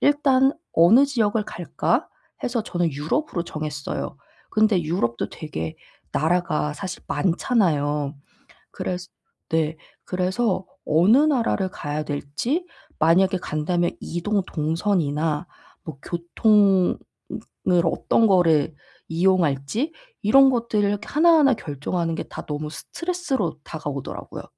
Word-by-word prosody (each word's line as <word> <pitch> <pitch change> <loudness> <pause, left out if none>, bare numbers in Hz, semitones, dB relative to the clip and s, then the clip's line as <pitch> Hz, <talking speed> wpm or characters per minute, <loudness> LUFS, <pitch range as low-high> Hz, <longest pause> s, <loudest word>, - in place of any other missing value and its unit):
일단 275 -2 +4 0.2
'어느 210 +12 +7
지역을 220 -5 0
갈까?' 175 -4 -1 0.4
해서 240 -2 -1
저는 175 -6 -1
유럽으로 170 - -2
정했어요. 150 -3 -5 0.3
근데 215 -4 +3
유럽도 150 -8 -1
되게 80 - -6 0.4
나라가 155 -2 +1
사실 185 0 -6
많잖아요. 150 - +1 0.6
그래서 180 0 -4 0.4
네. 160 -1 0 0.3
그래서 185 +2 0 0.2
어느 180 - +5
나라를 250 -10 +2
가야 150 -3 -4
될지 150 - -2 0.3
만약에 185 +4 +4
간다면 175 +2 -1
이동 195 +4 -1
동선이나 160 -1 -1 0.4
뭐 155 -4 -8
교통은 190 +2 +3 0.7
을 175 -1 +4
어떤 225 +6 +2
거를 165 -5 +3 0.4
이용할지 175 - +1 0.3
이런 270 +6 +6
것들을 230 -5 +1
이렇게 205 +2 -3
하나하나 310 -3 +5
결정하는 165 - -3
게 - - -3
다 - - -9
너무 150 0 -4
스트레스로 280 - -3
다가오더라고요. 145 -4 -6
180 Hz, 270 characters per minute, -23 LUFS, 155-220 Hz, 0.7 s, 어느